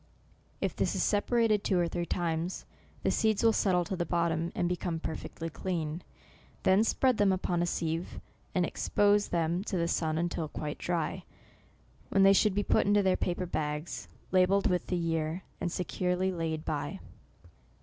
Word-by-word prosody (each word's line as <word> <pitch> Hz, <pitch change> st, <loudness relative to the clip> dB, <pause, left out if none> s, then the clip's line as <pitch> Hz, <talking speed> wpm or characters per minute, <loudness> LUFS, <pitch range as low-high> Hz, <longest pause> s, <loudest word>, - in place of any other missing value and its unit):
If -, -, -1 dB
this -, -, 0 dB
is -, -, +1 dB
repeated 215 Hz, 0 st, +2 dB
two 190 Hz, -, +1 dB
or 175 Hz, -1 st, +2 dB
three 170 Hz, 0 st, -3 dB
times, 170 Hz, +1 st, -2 dB, 0.4 s
the -, -, +2 dB
seeds 220 Hz, -1 st, +1 dB
will 225 Hz, -1 st, +5 dB
settle 180 Hz, -4 st, +2 dB
to 190 Hz, -, -3 dB
the 175 Hz, -, -1 dB
bottom, 170 Hz, 0 st, 0 dB
and 175 Hz, -, +1 dB
become 175 Hz, -1 st, -2 dB
perfectly 160 Hz, +1 st, -5 dB
clean. 165 Hz, -1 st, -3 dB, 0.6 s
Then 190 Hz, +3 st, +5 dB
spread 255 Hz, +1 st, +2 dB
them 205 Hz, -2 st, +4 dB
upon 180 Hz, -2 st, 0 dB
a 175 Hz, -, +1 dB
seive, 165 Hz, 0 st, -2 dB, 0.4 s
and 180 Hz, -1 st, +3 dB
expose 205 Hz, +3 st, +2 dB
them 170 Hz, +2 st, 0 dB
to 190 Hz, -, -2 dB
the 170 Hz, -1 st, +1 dB
sun 160 Hz, -2 st, 0 dB
until 170 Hz, -1 st, -1 dB
quite 150 Hz, 0 st, -5 dB
dry, 175 Hz, +1 st, -2 dB, 0.9 s
when 195 Hz, -, +4 dB
they 195 Hz, 0 st, +8 dB
should 200 Hz, 0 st, +3 dB
be 205 Hz, -, +1 dB
put -, -, +2 dB
into 200 Hz, -2 st, +4 dB
paper 180 Hz, +1 st, -1 dB
bags, 150 Hz, -1 st, -3 dB, 0.2 s
labelled 190 Hz, +2 st, +4 dB
with 180 Hz, -2 st, +1 dB
the 180 Hz, -, 0 dB
year, 165 Hz, +1 st, -1 dB, 0.2 s
and 175 Hz, -, -2 dB
securely 180 Hz, +1 st, -1 dB
laid 160 Hz, -3 st, -3 dB
by. -, -, -3 dB
175 Hz, 170 wpm, -30 LUFS, 165-190 Hz, 0.9 s, they